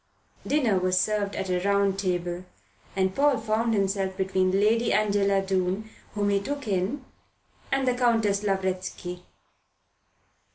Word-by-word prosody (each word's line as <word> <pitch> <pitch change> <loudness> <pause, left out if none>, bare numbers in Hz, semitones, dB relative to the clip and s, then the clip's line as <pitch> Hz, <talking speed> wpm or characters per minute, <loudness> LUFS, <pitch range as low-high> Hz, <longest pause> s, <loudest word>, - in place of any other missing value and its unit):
Dinner 245 -10 +2
was 185 0 +2
served 205 +1 0
at 190 -1 -3
a 180 - +1
round 200 0 +1
table, 180 -2 -2 0.5
and 190 -1 +1
Paul 285 +1 +3
found 225 +1 0
himself 195 -1 0
between 190 -1 +1
Lady 215 +4 +2
Angela 200 -2 +2
Doon, 190 +3 -1 0.2
whom 205 -1 +1
he 200 0 +2
took 280 +4 -5
in, 205 +8 -1 0.7
and 270 -1 +1
the 250 - +3
Countess 225 -5 +2
Lavretsky. 185 -2 -3
200 Hz, 130 wpm, -26 LUFS, 190-220 Hz, 0.7 s, Paul